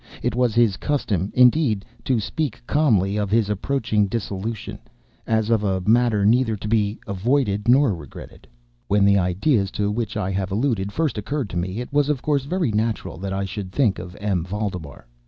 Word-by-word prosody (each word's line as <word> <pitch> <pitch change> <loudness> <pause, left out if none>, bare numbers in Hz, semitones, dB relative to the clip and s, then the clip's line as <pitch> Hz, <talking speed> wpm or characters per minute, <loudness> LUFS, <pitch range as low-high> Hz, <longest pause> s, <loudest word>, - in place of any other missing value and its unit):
It - - 0
was 125 -3 +1
his 115 -5 +3
custom, 105 - -1
indeed, 125 -4 +4 0.2
to 125 -3 +2
speak 125 +4 -3
calmly 105 -11 +2
of 105 -2 -1
his 105 -1 +2
approaching 105 -1 0
dissolution, 105 0 -4 0.5
as 110 0 +1
of 110 -2 +2
a 95 -2 0
matter 110 0 +3
neither 115 +1 +3
to 105 - -6
be 105 -1 0
avoided 105 +1 0
nor 130 -1 +5
regretted. 75 -6 -11 0.4
When 100 0 +3
the 100 0 +5
ideas 95 - +1
to 105 0 0
which 110 0 -3
I 95 -2 -1
have 95 0 -2
alluded 105 -3 0
first 150 -4 -1
occurred 130 +1 -3
to 85 - -4
me, 95 +6 -2
it 125 - -8
was 145 0 +2
of 145 -4 -1
course 145 -3 0
very 170 -4 0
natural 110 -5 -2
that 95 +1 -4
I 95 0 -1
should 95 -1 -6
think 110 -5 +1
of 90 0 -9
M. 100 -5 -1
Valdemar. 90 - -5
105 Hz, 185 wpm, -22 LUFS, 100-125 Hz, 0.5 s, nor